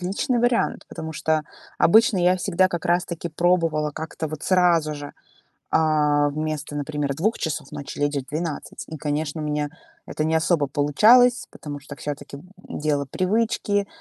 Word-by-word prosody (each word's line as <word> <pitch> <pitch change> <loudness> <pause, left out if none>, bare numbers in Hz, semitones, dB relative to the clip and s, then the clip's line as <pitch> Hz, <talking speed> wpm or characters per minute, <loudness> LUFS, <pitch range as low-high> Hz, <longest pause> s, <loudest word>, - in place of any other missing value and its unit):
уотличный 195 +7 -1
вариант, 240 0 +1
потому 160 0 -6
что 155 0 0 0.3
обычно 220 +3 +5
я 180 +1 +3
всегда 185 0 +2
как 175 -2 -4
раз 175 +1 +2
таки 170 -1 -5
пробовала 165 -2 +1
как-то 160 +1 -5
вот 155 0 -7
сразу 170 -4 +3
же, 145 -1 -8 0.6
а, 150 -2 +3
вместо, 155 0 -4
например, 145 -1 -2
2 195 +11 0
часов 150 -4 -3
ночи 145 +1 -7
лечь 145 0 0
в 135 -1 -4
12. 155 0 -4
И, 160 - -7
конечно, 150 +1 -2
у - - -3
меня 150 0 -1 0.4
это 155 - -3
не 160 +1 +1
особо 160 -2 +2
получалось, 220 - +4
потому 145 -1 -8
что 145 0 -10
всё-таки, 145 -1 -6
м, - - -14 0.4
дело 150 -1 0
привычки, 205 - 0
155 Hz, 165 wpm, -23 LUFS, 145-180 Hz, 0.6 s, обычно